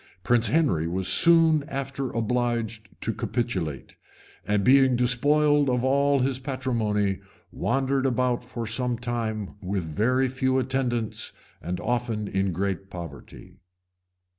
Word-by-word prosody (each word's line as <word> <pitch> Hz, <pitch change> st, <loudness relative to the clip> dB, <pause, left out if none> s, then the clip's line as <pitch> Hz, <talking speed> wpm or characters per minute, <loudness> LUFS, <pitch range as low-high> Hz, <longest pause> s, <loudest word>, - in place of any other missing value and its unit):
Prince 120 Hz, +2 st, +3 dB
Henry 135 Hz, -, +1 dB
was 90 Hz, +2 st, -1 dB
soon 165 Hz, -2 st, +5 dB
after 135 Hz, -2 st, -4 dB
obliged 115 Hz, -2 st, -2 dB
to -, -, -2 dB
capitulate; 95 Hz, -, -3 dB, 0.5 s
and 105 Hz, -1 st, +1 dB
being 130 Hz, +1 st, +5 dB
despoiled 145 Hz, +4 st, +3 dB
of 125 Hz, -1 st, 0 dB
all 140 Hz, +1 st, +3 dB
his 130 Hz, 0 st, 0 dB
patrimony, 115 Hz, -7 st, -1 dB, 0.3 s
wandered 135 Hz, +1 st, 0 dB
about 125 Hz, -1 st, 0 dB
for 115 Hz, -1 st, -6 dB
some 120 Hz, +2 st, -1 dB
time 115 Hz, -4 st, -4 dB
with 95 Hz, -1 st, -2 dB
very 120 Hz, -, +1 dB
few 130 Hz, 0 st, 0 dB
attendants, 125 Hz, -3 st, -2 dB, 0.3 s
and 90 Hz, +2 st, -4 dB
often 120 Hz, -3 st, -2 dB
in 95 Hz, -1 st, 0 dB
great 95 Hz, +1 st, -3 dB
poverty. 85 Hz, +2 st, -10 dB
120 Hz, 120 wpm, -25 LUFS, 105-130 Hz, 0.5 s, soon